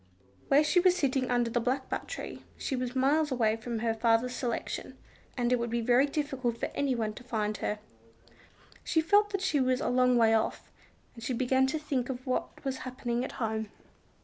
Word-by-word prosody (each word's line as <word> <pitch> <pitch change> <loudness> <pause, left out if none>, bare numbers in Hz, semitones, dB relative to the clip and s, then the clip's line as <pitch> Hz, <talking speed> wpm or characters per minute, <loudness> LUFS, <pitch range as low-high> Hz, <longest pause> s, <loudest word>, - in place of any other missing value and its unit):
Where 285 +2 +5
she 330 +4 +3
was 360 0 +4
sitting 270 -6 0
under 240 -1 +1
the 240 +1 +1
blackbutt 260 +3 -2
tree, - - -6 0.2
she 270 - -2
was 250 0 -3
miles 290 +3 +2
away 225 -4 +2
from 230 +1 -4
her 225 0 0
father's 230 +2 +2
selection, 245 -2 -4 0.4
and 245 0 +2
it 250 - +2
would 235 0 -2
be 235 +1 0
very 245 +4 +4
difficult 270 -5 -2
for - - -3
anyone 240 -6 0
to 245 - -11
find 215 -3 -2
her. 210 - -2 1.1
She 325 - +1
felt 410 +6 +4
that 395 -2 -2
she 370 -6 +1
was 255 -1 +2
a - - -1
long 250 0 +4
way 225 -1 +5
off, 220 0 -1 0.4
and 230 - -11
she 255 - -1
began 260 +2 +2
to 305 +4 -1
think 275 -5 -2
of 255 -1 -5
what 255 +1 -3
was 265 -1 -1
happening 245 -1 -3
at - - -5
home. 220 -2 -2
250 Hz, 200 wpm, -30 LUFS, 235-270 Hz, 1.1 s, Where